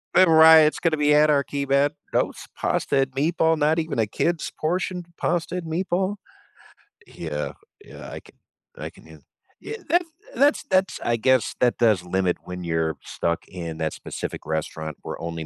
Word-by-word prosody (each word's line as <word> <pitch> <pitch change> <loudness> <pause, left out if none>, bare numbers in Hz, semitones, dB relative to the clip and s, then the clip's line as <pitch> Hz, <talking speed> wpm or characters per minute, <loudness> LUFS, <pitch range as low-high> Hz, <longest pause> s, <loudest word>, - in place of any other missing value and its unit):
The 185 -1 +6
riot's 160 -1 +7
gonna 165 -2 +1
be 150 0 +2
anarchy, 145 -2 +2
man, 140 +1 +3 0.2
"Those - - 0 0.2
pasta - - 0
and 135 -1 +1
meatball 160 +3 +2
not 155 +2 +2
even 160 -4 -3
a 110 - +2
kid's 165 +10 -1
portion 180 +3 -1
of 175 - -10
pasta 175 0 -1
and 180 -2 -4
meatball?" 185 +4 -1 0.9
Yeah, - - -5 0.3
yeah. - - -11
I - - -6
can - - -20 0.4
I - - -5
can - - -19
hea - - -14 0.4
Yeah, 450 - -6
that's 345 +2 +2 0.3
that's 290 +2 +3
that's 190 0 +1
I 120 - +1
guess, 130 +2 +2
that 120 -1 +3
does 110 -6 +3
limit 90 0 0
when 90 0 -7
you're 80 -2 -1
stuck 85 0 -3
in 85 -3 -6
that 80 -1 -2
specific - - -6
restaurant 80 -1 -4
where - - -7
only 85 -1 -5
145 Hz, 170 wpm, -24 LUFS, -, 0.9 s, riot's